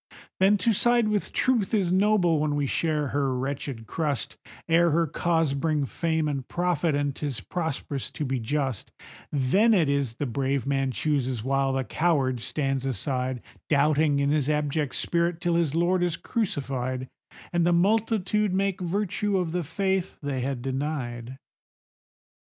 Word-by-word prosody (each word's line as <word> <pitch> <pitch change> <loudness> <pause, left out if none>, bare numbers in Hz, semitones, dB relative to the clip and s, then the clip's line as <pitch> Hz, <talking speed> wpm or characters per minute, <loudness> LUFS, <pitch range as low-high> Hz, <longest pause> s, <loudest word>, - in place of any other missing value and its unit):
Then 195 +2 +5
to 225 +4 +3
side 240 +1 +4
with 210 -1 -1
Truth 230 -5 +1
is 190 -5 +1
noble 185 -4 +3
when 150 -1 0
we 145 -1 0
share 150 0 0
her 135 -2 0
wretched 135 -3 -4
crust, 145 +2 -2 0.3
Ere 170 +1 +4
her 165 +2 +2
cause 165 -1 0
bring 150 0 0
fame 160 +2 -1
and 140 -3 -3
profit, 175 -3 0
and 145 -1 -1
'tis 140 -5 -2
prosperous 150 -5 -3
to 150 - -4
be 130 -1 -1
just; 130 0 -2 0.4
Then 190 - +3
it 165 -6 +3
is 140 -5 0
the 145 - -3
brave 135 +1 -1
man 135 -1 0
chooses, 130 -4 -1
while 135 +1 +1
the 135 0 0
coward 135 -1 +1
stands 135 +1 -2
aside, 130 0 -2 0.3
Doubting 150 0 +3
in 140 0 +1
his 150 -2 +1
abject 150 -1 0
spirit, 170 0 0
till 175 0 0
his 165 -3 +1
Lord 175 +2 +2
is 175 -1 0
crucified, 130 - -2 0.5
And 175 -1 +2
the 175 - +3
multitude 210 +1 +2
make 195 -1 0
virtue 200 +2 -1
of 175 -3 -1
the 180 +1 -1
faith 190 +3 -1
they 140 -2 -2
had 130 -1 -3
denied. 130 -3 -3
150 Hz, 160 wpm, -26 LUFS, 135-175 Hz, 0.5 s, Then